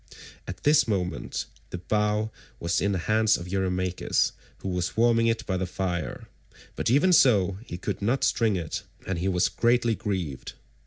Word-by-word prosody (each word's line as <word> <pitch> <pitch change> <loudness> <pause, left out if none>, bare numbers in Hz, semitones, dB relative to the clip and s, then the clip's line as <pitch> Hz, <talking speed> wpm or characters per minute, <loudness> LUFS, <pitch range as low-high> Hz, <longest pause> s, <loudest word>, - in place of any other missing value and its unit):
At 90 0 -7
this 150 -1 +4
moment 90 -4 -2 0.2
the - - -5
bow 105 +3 0 0.3
was 85 0 0
in 100 +2 +1
the 95 - 0
hands 110 0 +3
of 85 - -8
Eurymachus, 90 -1 0 0.3
who 95 - -5
was 90 +2 -2
warming 115 0 +4
it 115 +1 0
by 95 - -1
the 90 0 -2
fire, 90 -2 -3 0.5
but - - -1
even 150 +9 +4
so 100 - +4
he 85 - -5
could 90 - -4
not 120 +7 +1
string 110 -4 +2
it, 85 -4 -3 0.2
and 90 -2 -2
he 90 - -1
was 90 -2 +2
greatly 120 -1 +2
grieved. 90 -10 -4
95 Hz, 170 wpm, -26 LUFS, 90-115 Hz, 0.5 s, this